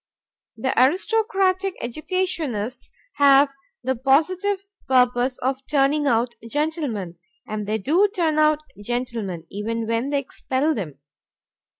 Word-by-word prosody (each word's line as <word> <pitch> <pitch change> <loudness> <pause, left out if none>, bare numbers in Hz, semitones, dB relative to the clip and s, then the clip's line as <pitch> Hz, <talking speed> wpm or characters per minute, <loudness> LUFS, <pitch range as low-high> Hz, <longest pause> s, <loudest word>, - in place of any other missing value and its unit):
The 260 +4 -1
aristocratic 385 - +1
educationists 265 - -3 0.3
have 280 -1 +6 0.3
the 260 0 0
positive 365 - +1 0.2
purpose 250 0 +3
of 265 +1 -2
turning 290 +1 +2
out 235 -1 +2 0.2
gentlemen, 275 - -2 0.3
and 210 -1 -4
they 215 +1 0
do 325 - +3
turn 325 -6 +1
out 305 0 +4 0.2
gentlemen, 230 -8 -3
even 225 +3 -3
when 230 +4 -1
they 285 - +1
expel 275 +2 -1
them. 165 - -5
270 Hz, 110 wpm, -23 LUFS, 230-315 Hz, 0.3 s, have